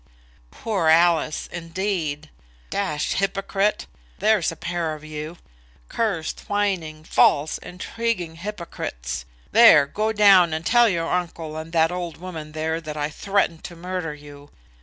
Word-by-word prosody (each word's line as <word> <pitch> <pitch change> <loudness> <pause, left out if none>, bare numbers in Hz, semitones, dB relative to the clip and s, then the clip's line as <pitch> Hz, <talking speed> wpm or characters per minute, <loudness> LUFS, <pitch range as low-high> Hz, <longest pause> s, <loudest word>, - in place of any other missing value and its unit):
"Poor 200 - -2
Alice, 165 -1 +3
indeed! 165 -4 -3 0.4
D - - -3
hypocrite! 195 +4 0 0.3
There's 215 -7 +2
a - - -8
pair 170 -1 -3
of 150 - -13
you; 155 +2 -7 0.5
cursed, 190 -9 -2
whining, 185 -7 -1
false, 150 -1 +3
intriguing 180 -3 -4
hypocrites. 65 - -5 0.3
There; 165 -12 +8
go 215 +9 -1
down 195 -6 +6
and 160 +1 -3
tell 240 0 +5
your 165 -3 -1
uncle 165 -3 -3
and 160 +1 -7
that 165 0 +3
old 175 -2 -4
woman 160 -4 -8
there 160 +1 -2
that 155 -1 -7
I 150 0 -2
threatened 195 -3 0
to 175 - -8
murder 175 -2 -4
you. 145 -1 -13
165 Hz, 135 wpm, -23 LUFS, 155-195 Hz, 0.5 s, There